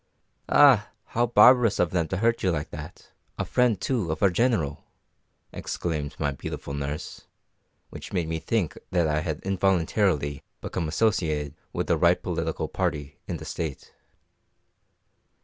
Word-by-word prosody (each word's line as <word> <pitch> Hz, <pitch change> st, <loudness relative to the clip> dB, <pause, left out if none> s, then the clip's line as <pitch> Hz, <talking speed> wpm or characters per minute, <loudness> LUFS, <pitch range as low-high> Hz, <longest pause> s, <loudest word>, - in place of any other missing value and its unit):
"Ah, 130 Hz, -8 st, +6 dB, 0.2 s
how 120 Hz, +1 st, +1 dB
barbarous 120 Hz, 0 st, +6 dB
of 90 Hz, -, +1 dB
them 85 Hz, -3 st, 0 dB
to 95 Hz, -, -2 dB
hurt 115 Hz, +3 st, +1 dB
you 95 Hz, -, +2 dB
like 80 Hz, -3 st, -2 dB
that! 75 Hz, +3 st, -10 dB, 0.3 s
a -, -, -2 dB
friend, 120 Hz, -6 st, +2 dB
too, 110 Hz, -11 st, -1 dB
of 80 Hz, -, -3 dB
our 100 Hz, -, +5 dB
General!" 90 Hz, -, 0 dB, 0.7 s
exclaimed 75 Hz, -4 st, -3 dB
my 75 Hz, -2 st, 0 dB
beautiful 70 Hz, +1 st, -6 dB
nurse; 70 Hz, +1 st, -5 dB, 0.6 s
which -, -, -9 dB
made 90 Hz, -4 st, -1 dB
me 80 Hz, 0 st, -2 dB
think 100 Hz, -3 st, -1 dB
that 85 Hz, -3 st, +2 dB
I 75 Hz, 0 st, +1 dB
had 75 Hz, -2 st, -3 dB
involuntarily 95 Hz, -6 st, +1 dB, 0.2 s
become 85 Hz, -4 st, -3 dB
associated 80 Hz, -6 st, 0 dB, 0.2 s
with -, -, -2 dB
the -, -, +2 dB
right -, -, +4 dB
political -, -, -2 dB
party 75 Hz, -1 st, -3 dB
in -, -, -3 dB
the -, -, -9 dB
State. 80 Hz, -5 st, -5 dB
85 Hz, 150 wpm, -26 LUFS, 75-105 Hz, 0.7 s, Ah